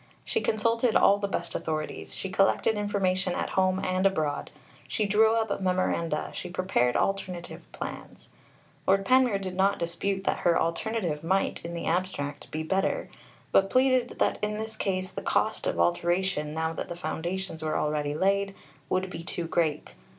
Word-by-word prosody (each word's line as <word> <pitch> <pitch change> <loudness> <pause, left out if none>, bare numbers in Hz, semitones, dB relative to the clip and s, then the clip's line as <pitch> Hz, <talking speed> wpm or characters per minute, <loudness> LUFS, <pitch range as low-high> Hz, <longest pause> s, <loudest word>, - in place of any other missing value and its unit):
She 455 - 0
consulted 230 +2 +1
all 200 +1 +6
the 200 - -1
best 175 -3 -3
authorities, 155 -1 -4
she 190 - -4
collected 195 +3 +3
information 190 -3 0
at - - -2
home 185 0 +2
and 185 0 0
abroad, 155 -6 -1 0.4
she 215 - 0
drew 220 +2 +4
up 220 -3 0
memoranda, 180 -4 0
she 180 - -5
prepared 175 -10 +1
alternative 185 -3 -2
plans. - - -8 0.6
Lord 195 +1 +4
Panmure 255 -4 +4
did 190 -2 -5
not 195 +2 +3
dispute 190 +3 -2
that - - 0
her 170 -1 +3
alternative 170 -2 -1
might, 190 +4 0
in 170 +1 -5
the 170 - -4
abstract, 165 -5 -2
be 155 +1 -3
better, 190 +4 0 0.4
but 195 0 +4
pleaded 255 0 +2
that - - +1
in 210 0 0
this 220 +1 -5
case 185 -2 -1
the - - -5
cost - - 0
of 85 - -1
alteration, 150 - +1
now 160 +1 -1
that - - -5
the 175 - -4
foundations 175 0 -4
were 155 -1 -1
already 150 -1 0
laid, 195 +3 +1 0.3
would 185 0 +1
be 165 - -6
too 170 0 -3
great. 155 - 0
185 Hz, 165 wpm, -28 LUFS, 165-200 Hz, 0.6 s, all